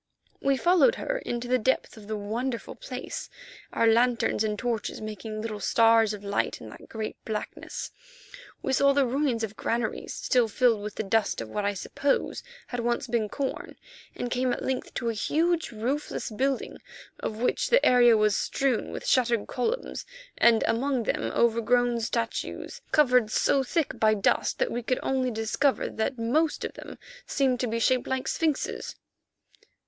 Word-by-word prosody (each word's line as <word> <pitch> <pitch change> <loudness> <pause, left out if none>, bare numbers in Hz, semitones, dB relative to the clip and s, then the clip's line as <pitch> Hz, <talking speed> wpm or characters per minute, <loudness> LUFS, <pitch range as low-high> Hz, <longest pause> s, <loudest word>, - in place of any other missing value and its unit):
We 275 0 +2
followed 365 - +4
her - - -2
into 240 - -4
the 255 +1 +2
depth 260 +3 0
of 215 -2 -13
the 215 0 -3
wonderful 230 +4 -3
place, - - -6 0.4
our - - +1
lanterns 230 -1 +3
and 210 -1 -1
torches 235 -2 -2
making 215 0 -6
little 215 -2 -4
stars 225 0 +4
of 210 -1 -7
light 200 0 -1
in - - -10
that - - -13
great 220 -1 -6
blackness. 215 -1 -5 0.7
We 265 - 0
saw 280 +1 +4
the 280 -1 +3
ruins 255 -2 0
of 215 -1 -4
granaries 230 0 -2
still 245 -3 +2
filled 225 0 +2
with 210 0 -6
the - - -2
dust 215 +1 +1
of 115 - -5
what 205 - -2
I 205 0 0
suppose 275 +8 -1 0.2
had 245 - -5
once 240 0 0
been 230 -3 -1
corn, 275 +2 -4 0.4
and 245 - -4
came 255 0 +1
at - - -3
length 260 -1 -2
to 235 - -1
a - - -1
huge, 330 +9 0
roofless 240 +4 -3
building 265 +4 -1 0.4
of 215 - -4
which 245 +3 0
the - - +4
area 240 -2 +6
was 215 -1 +3
strewn 270 -4 0
with - - -6
shattered 240 -4 +2
columns, 450 - -2 0.3
and 230 -2 +5
among 255 +1 0
them - - -1
overgrown 235 +1 +2
statues, 230 - -3
covered 250 -7 +4
so 270 +5 +2
thick 290 +4 -1
by 215 0 +4
dust 200 - +1
that - - 0
we 240 - -2
could 250 +2 -1
only 260 -1 +1
discover 230 +5 0
that 250 +4 -2
most 295 +8 +1
of - - -5
them - - -10 0.3
seemed 260 -3 +1
to 250 - 0
be 230 +1 -1
shaped 255 +1 +2
like 260 -1 -2
sphinxes. 315 -4 -1
240 Hz, 170 wpm, -27 LUFS, 220-265 Hz, 0.7 s, area